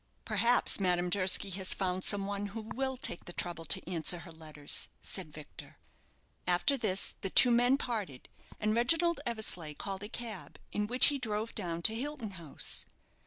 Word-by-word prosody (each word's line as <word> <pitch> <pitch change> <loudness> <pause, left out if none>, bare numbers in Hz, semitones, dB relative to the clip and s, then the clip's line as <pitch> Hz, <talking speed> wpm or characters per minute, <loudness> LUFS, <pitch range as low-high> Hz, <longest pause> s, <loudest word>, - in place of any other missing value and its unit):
"Perhaps 230 +2 +3
Madame 180 -2 +1
Durski 190 +1 +2
has 190 0 +1
found 185 -1 -1
some 200 -1 +4
one 200 0 -3
who 220 +3 -6
will 265 0 -2
take 210 -8 -5
the 175 - -9
trouble 170 -2 -2
to - - +1
answer 175 -1 0
her 170 0 -11
letters," 155 -2 -3
said 180 -5 -3
Victor. 150 0 -12 0.7
After 180 +10 +3
this, 205 -7 +1
the 195 - -2
two 245 +5 +7
men 245 +3 +4
parted, 210 - -4 0.3
and 215 0 +1
Reginald 330 +8 +2
Eversleigh 180 -9 -3
called 195 +3 -5
a 205 - -6
cab, 225 -5 -6
in 210 0 -1
which 250 +3 +6
he 285 -1 -2
drove 220 -2 -2
down 170 -4 -4
to 220 - +5
Hilton 245 -2 -4
House. 170 -6 -3
200 Hz, 170 wpm, -32 LUFS, 175-235 Hz, 0.7 s, two